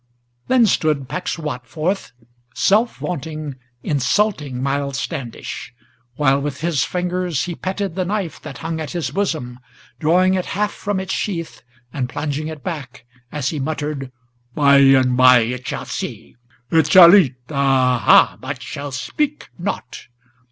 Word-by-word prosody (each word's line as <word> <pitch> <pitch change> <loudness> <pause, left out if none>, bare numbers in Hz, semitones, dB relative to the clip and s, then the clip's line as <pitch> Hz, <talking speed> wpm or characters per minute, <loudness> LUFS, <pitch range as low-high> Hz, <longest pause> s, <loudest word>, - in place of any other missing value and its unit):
Then 255 -3 +5
stood 155 -8 +1
Pecksuot 150 -5 -4
forth, 170 - -2 0.4
self 220 +4 +2
vaunting, 155 -4 -5 0.3
insulting 145 -1 0
Miles 140 0 -1
Standish: 130 -5 -6 0.4
While 140 -1 +2
with 145 0 -4
his 165 -4 +1
fingers 180 -5 -1
he 175 - -4
petted 190 +1 -3
the 185 - -1
knife 190 -2 -3
that 140 -5 -8
hung 165 0 -2
at 155 - -5
his 175 -3 -2
bosom, 155 -11 -2 0.4
Drawing 180 +5 +3
it 185 -1 -1
half 210 0 +1
from 205 -1 -3
its 190 0 -3
sheath, 170 -5 -3 0.3
and 130 -3 -2
plunging 145 +2 -3
it 155 -2 -8
back, 140 -9 -6 0.3
as 145 -3 -2
he 155 - -4
muttered, 145 -2 -3 0.4
"By 140 -1 +5
and 135 -2 +5
by 125 -1 +7
it 125 +2 -4
shall - - -4
see; - - -6 0.4
it 160 -2 +3
shall 175 -1 +10
eat; 160 -11 +5 0.2
ah, 135 -3 +2
ha! - - +5
but - - -6
shall 140 0 -6
speak 295 - -3
not! 185 -8 -5
155 Hz, 145 wpm, -20 LUFS, 135-180 Hz, 0.4 s, shall